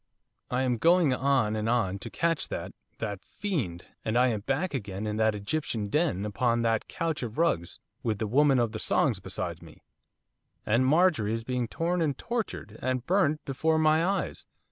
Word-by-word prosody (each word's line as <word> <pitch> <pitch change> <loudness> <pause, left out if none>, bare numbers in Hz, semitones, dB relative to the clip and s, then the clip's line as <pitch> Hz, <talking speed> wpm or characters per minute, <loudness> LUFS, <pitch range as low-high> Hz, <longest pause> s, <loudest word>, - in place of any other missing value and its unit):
I 125 +1 0
am 125 -2 +1
going 170 -1 +4
on 130 -5 +2
and 110 +1 -1
on 105 -5 +1
to - - -7
catch 165 -2 0
that - - -5 0.3
that 105 -4 -4
fiend, 120 - -3 0.2
and 110 +2 0
I 125 +1 +5
am 110 -3 -1
back 140 - -1
again 105 -5 -4
in 105 0 -2
that 110 -1 +2
Egyptian 110 -1 -2
den, 145 - +1
upon 115 +3 +1
that 115 -1 +1
couch 165 -3 -2
of 115 -3 -5
rugs, 120 - 0 0.2
with 110 -2 -1
the 110 - -2
Woman 135 +5 +4
of 120 -3 +1
the 110 - -5
Songs - - +1
beside - - -4
me, - - -15 0.8
and 120 +4 +3
Marjorie 150 - +3
is 115 - -4
being 125 0 -1
torn 170 +7 -1
and 150 -4 0
tortured, 220 - -4
and 130 -1 -1
burnt 170 -5 +2
before 160 +4 +1
my 155 +1 +4
eyes! 195 +3 -2
125 Hz, 185 wpm, -28 LUFS, 110-155 Hz, 0.8 s, I